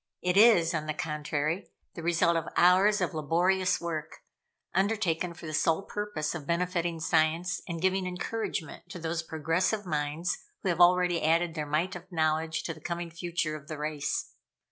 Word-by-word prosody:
It 180 Hz, 0 st, +1 dB
is, 195 Hz, -6 st, +6 dB
on 155 Hz, -2 st, -2 dB
the 155 Hz, -, -2 dB
contrary, 150 Hz, +3 st, -2 dB, 0.2 s
the 170 Hz, -, -7 dB
result 170 Hz, 0 st, +2 dB
of 165 Hz, -1 st, -1 dB
hours 190 Hz, +4 st, +5 dB
of 180 Hz, -, 0 dB
laborious 175 Hz, +5 st, +1 dB
work, 160 Hz, -2 st, -5 dB, 0.5 s
undertaken 185 Hz, -4 st, 0 dB
for 170 Hz, -, -11 dB
the 155 Hz, -, -5 dB
sole 160 Hz, +4 st, +2 dB
purpose 205 Hz, -9 st, -3 dB
of 155 Hz, -4 st, -7 dB
benefiting 170 Hz, -1 st, 0 dB
Science 160 Hz, +2 st, +1 dB
and 170 Hz, -1 st, -4 dB
giving 190 Hz, +1 st, +1 dB
encouragement 180 Hz, -2 st, -4 dB
to 185 Hz, -, -7 dB
those 165 Hz, 0 st, -2 dB
progressive 165 Hz, +6 st, -1 dB
minds 155 Hz, +2 st, -1 dB, 0.2 s
who 190 Hz, -, 0 dB
have 175 Hz, 0 st, +1 dB
already 180 Hz, -1 st, +5 dB
added 165 Hz, +2 st, +2 dB
their 155 Hz, -2 st, -4 dB
mite 165 Hz, +6 st, 0 dB
of 180 Hz, +2 st, -10 dB
knowledge 160 Hz, -1 st, 0 dB
to 165 Hz, -, -3 dB
the 155 Hz, -, -15 dB
coming 170 Hz, 0 st, -4 dB
future 170 Hz, -2 st, -2 dB
of 150 Hz, -1 st, -10 dB
the 155 Hz, -, -5 dB
race. 150 Hz, -1 st, -2 dB
170 Hz, 170 wpm, -29 LUFS, 155-180 Hz, 0.5 s, is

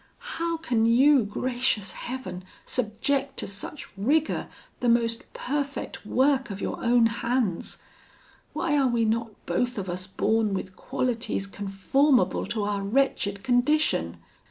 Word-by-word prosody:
How 335 Hz, 0 st, 0 dB
can 235 Hz, -8 st, +1 dB
you, 265 Hz, +3 st, +6 dB
gracious 240 Hz, -2 st, 0 dB
Heaven! 245 Hz, -8 st, -6 dB, 0.2 s
subject 265 Hz, +4 st, -1 dB
to -, -, -1 dB
such 205 Hz, +8 st, -6 dB
rigour 290 Hz, +10 st, +1 dB, 0.3 s
the 245 Hz, -, +1 dB
most 230 Hz, 0 st, +1 dB
perfect 280 Hz, -3 st, -3 dB
work 265 Hz, +1 st, +2 dB
of 200 Hz, -1 st, -5 dB
your -, -, -4 dB
own 240 Hz, -1 st, +5 dB
hands? 230 Hz, -4 st, -1 dB, 0.7 s
Why 315 Hz, -4 st, 0 dB
are 275 Hz, -2 st, +4 dB
we 235 Hz, -2 st, +2 dB
not 230 Hz, +1 st, 0 dB, 0.2 s
both 245 Hz, -1 st, 0 dB
of 190 Hz, -3 st, -3 dB
us 180 Hz, +1 st, -4 dB
born 215 Hz, +1 st, +1 dB
with 190 Hz, 0 st, -5 dB
qualities 235 Hz, -2 st, -2 dB
conformable 205 Hz, +8 st, +1 dB
to 215 Hz, -3 st, -2 dB
our 205 Hz, -1 st, -1 dB
wretched 200 Hz, -3 st, 0 dB
condition? 245 Hz, -, +2 dB
235 Hz, 130 wpm, -26 LUFS, 205-265 Hz, 0.7 s, you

